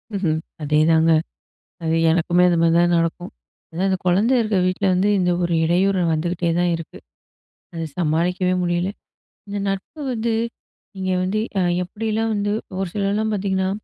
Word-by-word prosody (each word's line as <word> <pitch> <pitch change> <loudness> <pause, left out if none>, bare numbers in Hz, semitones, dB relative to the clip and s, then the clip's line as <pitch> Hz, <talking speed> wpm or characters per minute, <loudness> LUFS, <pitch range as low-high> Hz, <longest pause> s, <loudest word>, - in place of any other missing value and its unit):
ம்ஹ்ம். 165 -5 0 0.3
அதேதாங்க, 160 +2 +3 0.7
அது 160 0 +1 0.2
எனக்குமே 175 +1 +2
அது 170 - +2
மாதிரி 165 0 +3
தான் 175 0 +3
நடக்கும். 165 +2 -2 0.4
அதான் 180 +4 -1
அந்த 190 - +1
குழந்தை 200 +8 +3
இருக்குற 215 -4 0
வீட்ல 185 +2 -1
வந்து, 185 +3 +2
இந்த 180 -1 +2
ஒரு 170 0 0
இடையூறு 185 +3 +2
வந்துக்கிட்டே 170 +2 -1
தான் 175 0 +2
இருக்கு. 165 -1 -9 0.8
அத 165 -1 -5 0.2
சமாளிக்கவே 180 +3 +1
முடியல. 175 +1 0 0.6
இந்த 200 0 -4
நட்பு 195 +10 -4
வந்து, 230 -1 -1 0.6
நீங்க 185 -1 -2
வந்து 195 +3 -1 0.2
அ - - +2 0.2
எப்படிலாம் 220 +4 -2
வந்து 205 0 -1 0.3
ஒரு 195 - -1
சிலர்லாம் 210 +2 0
பாத்தீங்கன்னா, 190 -2 0
180 Hz, 145 wpm, -21 LUFS, 170-200 Hz, 0.8 s, அதேதாங்க